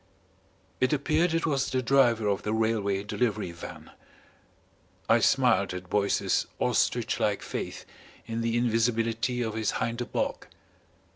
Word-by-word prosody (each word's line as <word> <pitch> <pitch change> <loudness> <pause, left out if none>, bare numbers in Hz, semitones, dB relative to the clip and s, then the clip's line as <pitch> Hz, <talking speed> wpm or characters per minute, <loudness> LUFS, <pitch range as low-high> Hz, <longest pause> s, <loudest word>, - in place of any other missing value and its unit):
It 130 +3 +2
appeared 155 +4 +1
it 165 +1 0
was 140 -4 0
the 130 0 -1
driver 120 -4 +3
of 100 -1 0
the 105 - -2
Railway 105 -3 0
Delivery 105 -2 -1
Van. 85 - -10 1.2
I - - +5
smiled 110 -8 +3
at 90 0 -8
Boyce's 100 -1 +1
ostrich - - +1
like - - 0
faith - - -5 0.4
in 115 0 -3
the 115 0 0
invisibility 115 +1 +1
of 110 -2 -3
his 110 -1 -1
hinder 120 +1 -2
bulk. - - -3
115 Hz, 135 wpm, -28 LUFS, 105-125 Hz, 1.2 s, I